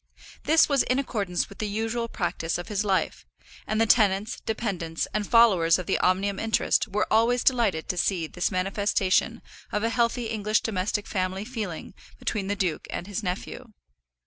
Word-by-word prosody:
This 320 +2 +5
was 280 -2 +3
in 255 - +1
accordance 205 -10 -1
with 200 - -14
the 215 - -1
usual 225 +3 -2
practice 175 -5 -2
of 175 - -7
his 205 -1 -1
life, 195 -2 0 0.4
and 215 - 0
the 225 - +4
tenants, 210 -1 +2
dependants, 185 -8 -3
and 210 -1 -1
followers 195 -9 +5
of 180 - -5
the - - 0
Omnium 195 +2 +1
interest 225 +1 +1
were 210 +1 0
always 235 +2 +3
delighted 230 -11 +2
to 180 - -1
see 175 -4 +1
this 180 +3 -2
manifestation 195 +1 0 0.3
of 210 - -1
a 230 - +2
healthy 235 0 0
English 215 -1 0
domestic 205 0 -2
family 190 +1 -2
feeling 215 -9 -5 0.2
between 195 - -3
the 205 - -1
duke 180 -5 -2
and - - -4
his 205 +2 -4
nephew. 210 +5 -5
205 Hz, 170 wpm, -26 LUFS, 185-225 Hz, 0.4 s, This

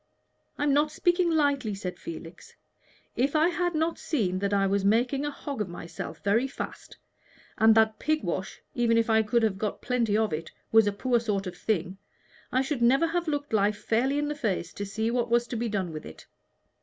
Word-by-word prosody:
"I'm 290 -1 +2
not 295 +1 +3
speaking 350 +2 +2
lightly," 285 -9 +1
said 185 -2 -6
Felix. 165 +1 -9 0.6
"If 275 +5 +1
I 315 +3 +4
had 350 -1 -1
not 320 +2 0
seen 195 - -1
that 200 +1 -1
I 200 -1 +3
was 195 0 +1
making 245 +7 +2
a - - 0
hog 280 -3 -5
of 200 - -2
myself 170 -1 -7
very 225 +6 +2
fast, 270 - -8 0.6
and 220 0 +6
that 220 -1 +3
pig 310 0 0
wash, 185 +1 -4
even 235 -2 +2
if 230 0 +2
I 220 0 +5
could 225 +2 +1
have 200 -3 +1
got 210 -1 -2
plenty 235 -4 +1
of 220 -5 +1
it, 160 +1 -4 0.2
was 225 -1 +6
a - - +3
poor 240 +4 +1
sort 205 -4 -2
of 180 -1 -6
thing, 190 -1 -2 0.5
I 260 +1 +2
should 270 -2 -3
never 265 +7 +4
have 345 +1 -1
looked 290 -4 -2
life 205 0 +2
fairly 255 +7 0
in 295 0 0
the 295 - -1
face 200 - -2
to 205 - -5
see 220 +3 -1
what 240 -1 0
was 235 0 +3
to 240 - -6
be 235 0 -1
done 190 -5 -2
with 155 - -7
it. 80 - -12
230 Hz, 210 wpm, -27 LUFS, 200-280 Hz, 0.6 s, and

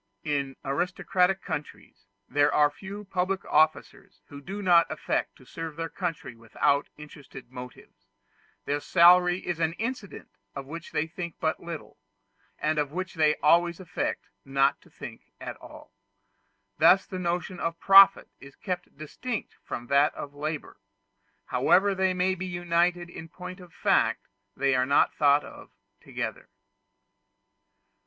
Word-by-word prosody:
In 140 -3 -2
aristocratic 180 +5 0
countries 145 -9 -7 0.2
there 145 +2 +2
are 150 -1 +4
few 200 +6 -9
public 190 0 -2
officers 155 -9 0
who 140 0 -10
do 200 +6 -6
not 175 -2 +5
affect - - -2
to - - -19
serve 165 -2 -7
their 165 +1 -4
country 165 -10 -5
without 115 +5 0
interested 145 -4 -12
motives. 125 -1 -12 0.6
Their 145 +1 -1
salary 180 +3 +5
is 175 -2 -3
an 165 0 +1
incident 225 -1 -6 0.3
of 140 -1 -6
which 165 +4 -8
they 155 - 0
think 170 +1 -7
but 160 -1 -1
little, 170 -2 -9 0.6
and 155 0 0
of 145 -1 -1
which 185 +3 -4
they 155 -2 +3
always 170 +3 +4
affect 180 -2 -4 0.2
not 135 0 +1
to - - -21
think - - -11
at - - -6
all. - - -14 0.9
Thus 195 - +6
the 185 - -6
notion 175 +1 -2
of 165 0 -3
profit 195 0 +7
is 140 0 -14
kept 180 -1 -5
distinct 220 - -5
from 120 - -6
that 140 +5 +3
of 145 - -7
labor; 150 -2 -5 0.7
however 200 +2 +3
they 190 -1 +1
may 185 +1 +1
be 185 0 -5
united 175 0 0
in 165 -1 -9
point 180 +2 -9
of 180 -2 -14
fact, - - +1 0.3
they 140 -1 +2
are 130 0 +2
not 140 - +3
thought 145 0 +4
of - - -12 0.3
together. - - -6
165 Hz, 145 wpm, -27 LUFS, 145-180 Hz, 0.9 s, profit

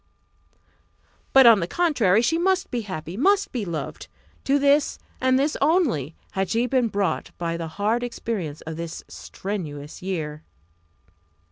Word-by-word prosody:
But, 270 -1 +7
on 230 -3 +8
the 170 - -2
contrary, 235 - +2
she 325 +7 +2
must 375 +1 +1
be 245 - -1
happy! 180 -4 -6
must 395 - +2
be 235 -5 -3
loved! 170 -3 -5 0.4
To 275 +1 +3
this, 285 +1 +3 0.2
and 260 0 +3
this 285 +3 +1
only, 275 - +2 0.2
had 190 -2 -1
she 235 +2 +1
been 250 -2 +2
brought 200 -2 -1
by 170 -1 -2
the 165 -1 -4
hard 215 +4 +1
experience 210 -10 -4
of 160 0 -7
this 170 -1 -6
strenuous 155 -7 -6
year. 155 -5 -4
215 Hz, 145 wpm, -24 LUFS, 170-270 Hz, 0.4 s, on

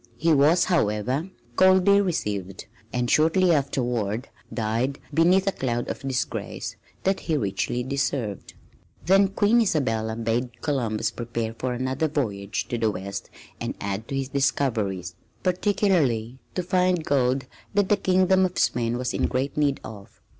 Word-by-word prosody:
He 165 +1 +3
was, 150 +5 +5
however, 130 - 0 0.3
coldly 190 +3 +5
received, 100 - -3 0.3
and 125 0 -1
shortly 165 +6 +4
afterward 125 -5 -1 0.2
died 115 +5 -1 0.2
beneath 180 +4 +4
a 195 - +2
cloud 120 -7 -2
of - - -6
disgrace 130 -2 -3 0.3
that 190 0 +1
he 160 -3 -1
richly 120 +2 -1
deserved. 130 -6 -2 0.5
Then 195 +2 +5
Queen 205 +4 +3
Isabella 115 - 0
bade 120 +1 -2
Columbus 115 -7 0
prepare 115 -1 -4
for 125 +2 -3
another 130 +5 -1
voyage 105 -10 -2
to 120 - -2
the 110 -1 +2
west 100 0 -5 0.3
and - - -3
add 100 +3 -4
to 140 - -4
his 135 -1 -2
discoveries, 110 -10 0 0.3
particularly 175 - +1 0.2
to 180 - -1
find 180 -2 +1
gold 130 -1 +1 0.3
that 205 -2 +2
the 205 - +5
Kingdom 190 0 +3
of 185 -1 -1
Spain 120 0 +1
was 125 0 -2
in - - +1
great 135 +2 -2
need 145 -2 +1
of. 100 -3 -11
130 Hz, 145 wpm, -25 LUFS, 115-175 Hz, 0.5 s, was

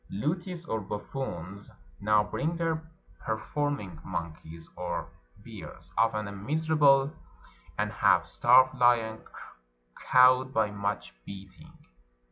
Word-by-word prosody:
Lutis 170 - -3
or 110 - -2
buffoons 100 -2 -6 0.3
now 105 +1 +3
bring 150 +10 -2
their 160 -1 -2 0.3
performing 110 - -3
mon 85 -3 -4
keys 80 +1 -12
or 90 -1 -4 0.4
bears - - -10
— - - -28
often 110 -2 +2
a - - -6
miserable 145 +5 +2 0.6
and - - -1
half - - +3
starved 130 +2 +5
lion 115 -2 +3 0.9
cowed 130 +1 +6
by 110 -5 +1
much 100 -10 -3
beating. 95 +4 -12
115 Hz, 110 wpm, -28 LUFS, 100-145 Hz, 0.9 s, cowed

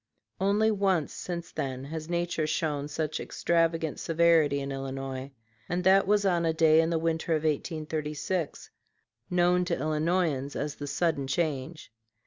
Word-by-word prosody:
Only 205 +3 +3
once 195 -6 +1
since 170 -2 -5
then 135 -3 -4
has 155 +3 -6
nature 170 -2 -1
shown 150 -2 -1
such 155 +1 -3
extravagant 165 -2 0
severity 165 -3 +3
in 140 0 -4
Illinois, 135 0 -5 0.4
and 180 +1 -1
that 190 +1 +5
was 205 0 +3
on 175 -3 +2
a 165 -1 +2
day 160 0 +5
in 165 - 0
the 170 - +1
winter 165 0 0
of 155 -1 0
1836, 155 +1 -2 0.6
known 180 0 +3
to - - -1
Illinoisans 155 -2 0
as 150 0 -2
"the 145 - -6
sudden 140 -1 0
change." 155 0 -2
160 Hz, 145 wpm, -28 LUFS, 145-175 Hz, 0.6 s, that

